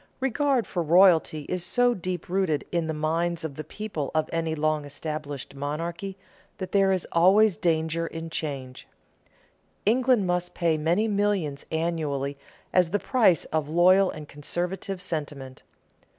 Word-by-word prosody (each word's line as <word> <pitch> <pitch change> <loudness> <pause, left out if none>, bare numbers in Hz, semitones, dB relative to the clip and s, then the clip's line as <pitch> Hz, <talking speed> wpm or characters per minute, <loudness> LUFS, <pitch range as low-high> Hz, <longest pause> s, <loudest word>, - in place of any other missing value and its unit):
Regard 270 -1 +1
for 175 - -2
royalty 165 -2 +4
is 180 -1 -2
so 245 +6 +2
deep 180 -4 -4
rooted 180 -5 0
in 170 -2 0
the - - -1
minds 165 +2 -1
of 160 -3 -4
the 155 - -6
people 160 -3 -5
of 155 0 +2
any 165 -1 -1
long 155 0 0
established 145 -1 -6
monarchy 170 +7 -4 0.4
that 185 - -6
there 195 -1 +4
is 185 -2 0
always 190 +4 +5
danger 160 0 0
in 165 0 -7
change. 135 -5 -5 1.0
England 245 -1 +3
must 180 0 -1
pay 170 -2 +2
many 170 +8 +1
millions 200 -9 -1
annually 155 -4 -1 0.4
as 180 -2 +4
the 205 - +1
price 210 - +3
of 155 -2 0
loyal 185 +4 +5
and 155 -1 -7
conservative 180 +6 -4
sentiment. 145 -6 -5
170 Hz, 145 wpm, -26 LUFS, 155-190 Hz, 1.0 s, always